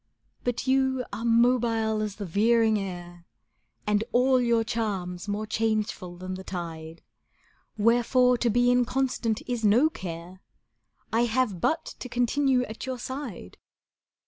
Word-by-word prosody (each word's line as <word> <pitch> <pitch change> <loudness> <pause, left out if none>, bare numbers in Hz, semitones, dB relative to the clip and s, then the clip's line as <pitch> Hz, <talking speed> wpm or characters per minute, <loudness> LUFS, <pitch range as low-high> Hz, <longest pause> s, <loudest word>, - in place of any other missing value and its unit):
But 245 -1 -2
you 260 -1 +1
are 230 - -4
mobile 230 -2 +2
as 210 -2 -3
the 205 - -6
veering 220 +4 +3
air, 175 -3 -7 0.6
And 210 0 +2
all 255 +1 +4
your 235 -2 +2
charms 195 -5 -3
more 205 +1 -2
changeful 215 -5 -2
than 185 +1 -6
the 190 0 -7
tide, 165 -3 -7 0.7
Wherefore 245 +3 +4
to 240 - +2
be 245 +2 +3
inconstant 245 -2 0
is 245 -3 -3
no 240 +10 +4
care: 175 - -8 0.7
I 235 +2 +3
have 230 -6 0
but 320 - +1
to 250 - -7
continue 250 +2 +2
at 225 +1 -7
your 260 -1 -3
side. 245 - -7
225 Hz, 135 wpm, -27 LUFS, 195-245 Hz, 0.7 s, all